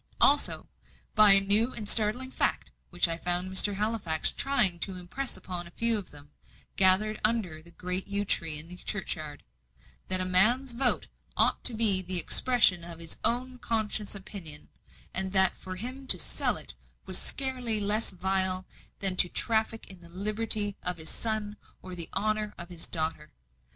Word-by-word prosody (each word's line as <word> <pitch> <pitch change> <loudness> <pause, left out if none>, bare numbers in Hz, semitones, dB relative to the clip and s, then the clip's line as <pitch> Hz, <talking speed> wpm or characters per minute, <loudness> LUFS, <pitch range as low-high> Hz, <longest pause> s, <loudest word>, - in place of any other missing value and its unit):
Also, 290 +1 +2 0.5
by 210 -2 +8
a 195 - +8
new 210 +5 +3
and 215 -2 -6
startling 235 +5 +2
fact - - -2 0.2
which - - 0
I 165 0 0
found 180 +2 +1
Mr. 195 +1 +3
Halifax 205 -6 -1
trying 215 -11 +3
to 190 +2 -4
impress 185 +8 -5
upon 180 -2 -7
a 170 - -18
few 230 0 +1
of 200 - -11
them, 145 0 -16 0.4
gathered 200 +3 +4
under 215 -8 -1
the 170 - -16
great 180 +2 -2
yew 200 0 -2
tree 165 -5 0
in 155 +2 -1
the 180 +1 -9
churchyard 160 -7 -5 0.6
that 185 0 +4
a 185 - -2
man's 225 +9 +2
vote 245 +1 +1 0.3
ought - - +1
to 240 - +2
be 210 -4 +7
the 185 0 +2
expression 190 -2 +3
of 170 -1 -10
his 165 -1 -6
own 250 +1 -1
conscientious 215 -3 -4
opinion; 190 -7 -10 0.4
and 190 0 -2
that 190 -1 +3
for 185 0 -9
him 255 +7 -8
to - - +3
sell - - -1
it - - -4 0.3
was - - -1
scarcely 255 -5 -2
less 210 +2 0
vile 185 0 -1 0.4
than 190 -2 +3
to 180 - +3
traffic 225 +1 -2
in 190 -3 -12
the 170 - -16
liberty 205 +2 0
of 180 -1 -1
his 160 -1 -4
son 215 -2 -3 0.3
or 185 - -10
the 170 -2 -4
honour 215 +1 -2
of 170 0 -10
his 175 -2 -5
daughter. 160 - -5
195 Hz, 175 wpm, -27 LUFS, 180-220 Hz, 0.6 s, by